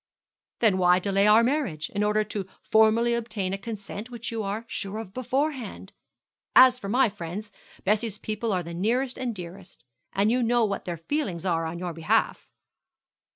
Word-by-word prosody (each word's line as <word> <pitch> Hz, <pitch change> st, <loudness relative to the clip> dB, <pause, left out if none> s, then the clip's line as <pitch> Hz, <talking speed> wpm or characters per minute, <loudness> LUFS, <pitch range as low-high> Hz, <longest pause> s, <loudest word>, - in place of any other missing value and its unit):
'Then 210 Hz, -5 st, +4 dB
why 180 Hz, 0 st, +5 dB
delay 195 Hz, +2 st, +2 dB
our 215 Hz, +2 st, +7 dB
marriage, 235 Hz, -, -1 dB
in 205 Hz, -, -2 dB
order 210 Hz, +1 st, +2 dB
to 205 Hz, -2 st, -5 dB, 0.2 s
formally 220 Hz, +2 st, +4 dB
obtain 215 Hz, -5 st, -2 dB
a -, -, -1 dB
consent 210 Hz, +1 st, -7 dB
which 235 Hz, -1 st, -6 dB
you 225 Hz, -1 st, -2 dB
are 210 Hz, +3 st, -3 dB
sure 200 Hz, -1 st, -4 dB
of 220 Hz, -4 st, -7 dB
beforehand! 255 Hz, -5 st, -3 dB, 0.6 s
As 255 Hz, -1 st, +8 dB
for 200 Hz, -, -6 dB
my 250 Hz, +4 st, +4 dB
friends, 205 Hz, +1 st, -6 dB, 0.3 s
Bessie's 215 Hz, +1 st, 0 dB
people 215 Hz, +1 st, -3 dB
are 180 Hz, -2 st, 0 dB
the 170 Hz, +1 st, -7 dB
nearest 245 Hz, +9 st, 0 dB
and 245 Hz, -3 st, -2 dB
dearest, 180 Hz, +1 st, -10 dB, 0.3 s
and 205 Hz, +3 st, +2 dB
you 250 Hz, +1 st, +2 dB
know 240 Hz, 0 st, +3 dB
what 200 Hz, -2 st, -3 dB
their 175 Hz, -2 st, -4 dB
feelings 185 Hz, -, -3 dB
are 165 Hz, -3 st, +1 dB
on 165 Hz, +1 st, -5 dB
your 175 Hz, -1 st, -4 dB
behalf.' 160 Hz, -1 st, 0 dB
210 Hz, 175 wpm, -26 LUFS, 190-235 Hz, 0.6 s, As